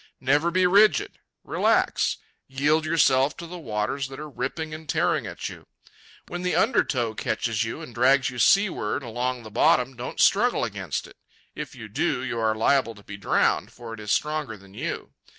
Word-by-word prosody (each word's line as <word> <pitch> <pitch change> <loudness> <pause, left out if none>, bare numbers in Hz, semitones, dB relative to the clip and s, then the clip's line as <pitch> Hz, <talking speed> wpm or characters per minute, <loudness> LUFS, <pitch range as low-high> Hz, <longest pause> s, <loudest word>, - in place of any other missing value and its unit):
Never 145 +6 +2
be 185 +1 +2
rigid. 200 -2 +4 0.2
Relax. - - +1 0.3
Yield 150 +4 +1
yourself 150 -4 +3
to 170 - -7
the 175 +1 -8
waters 115 +1 -2
that 135 +1 -9
are 155 - -6
ripping 155 +2 -4
and 155 -1 -9
tearing - - +1
at - - -5
you. - - -10 0.6
When 175 - -5
the 180 0 0
undertow 125 - +1
catches 110 0 -1
you 115 - -5
and 120 - -10
drags 130 +3 +4
you 125 - -7
seaward 180 - +2
along 125 +1 -3
the 110 - -10
bottom, 125 +3 +3
don't 120 +1 -7
struggle 240 +5 +4
against 95 - -3
it. - - -15 0.4
If - - -7
you - - -9
do, 125 - -1
you 125 -3 -3
are 110 -1 +1
liable 115 +1 +2
to 105 - -16
be 100 - -8
drowned, 100 - +1
for 115 -1 -9
it 115 - -8
is 105 -1 -4
stronger 150 -3 -1
than 95 0 -17
you. - - -5
130 Hz, 185 wpm, -25 LUFS, 115-155 Hz, 0.6 s, rigid